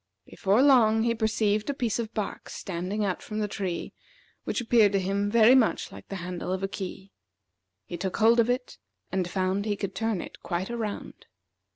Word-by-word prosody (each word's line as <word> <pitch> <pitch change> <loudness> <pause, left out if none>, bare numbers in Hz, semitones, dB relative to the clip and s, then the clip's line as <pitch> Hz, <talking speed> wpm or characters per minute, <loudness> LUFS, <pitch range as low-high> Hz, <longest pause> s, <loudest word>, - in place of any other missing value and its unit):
Before 205 +6 +2
long 225 -6 +5
he 235 0 +2
perceived 220 0 0
a 285 - -1
piece 240 -4 -1
of 225 -1 -3
bark 210 -3 -4
standing 190 +4 -3
out 185 -2 -2
from 215 - -6
the 210 -1 0
tree, 190 -4 -4 0.5
which - - -1
appeared 225 -4 +4
to 195 - +3
him 200 +2 0
very 230 +2 +6
much 255 -4 +2
like - - -12
the 195 - -6
handle 180 0 -4
of 190 +1 -2
a - - +1
key. 195 0 -7 0.7
He 175 - -6
took 185 +2 -3
hold 230 +2 +5
of 235 +1 +3
it, 250 0 -2 0.3
and 185 -2 -1
found 190 +2 0
he 210 -1 0
could 195 -1 -4
turn 225 -1 -1
it - - -9
quite 185 +4 -3
around. 225 -3 -5
205 Hz, 195 wpm, -27 LUFS, 190-225 Hz, 0.7 s, very